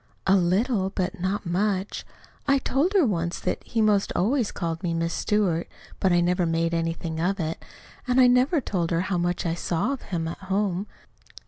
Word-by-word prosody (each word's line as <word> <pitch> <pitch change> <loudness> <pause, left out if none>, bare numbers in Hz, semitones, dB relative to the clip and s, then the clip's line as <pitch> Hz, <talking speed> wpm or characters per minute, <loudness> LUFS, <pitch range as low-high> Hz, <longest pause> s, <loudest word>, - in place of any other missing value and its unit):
"A 195 - +5
little, 190 +3 +2
but 185 -2 -3
not 190 +3 -2
much. 190 +2 -1 0.4
I 275 0 +5
told 280 +7 0
her 380 -7 +5
once 170 -6 -1
that - - -2
he 225 -1 0
'most 205 -2 +2
always 230 +3 +1
called 165 -2 -3
me 170 -2 -1
'Miss 165 0 -1
Stewart,' 190 -6 0 0.3
but 190 - +2
I 175 0 +4
never 180 0 +1
made 165 +1 0
anything 165 -1 -2
of 190 +4 0
it, 160 -1 -3 0.4
and 250 +1 +3
I 255 - +8
never 250 +6 +4
told 180 -9 -2
her 165 0 +1
how 185 -1 -1
much 175 +1 -1
I 165 - +1
saw 175 +8 -1
of 270 - -6
him 165 -4 -3
out 165 - -6
home. 195 0 -1
185 Hz, 195 wpm, -25 LUFS, 170-210 Hz, 0.4 s, I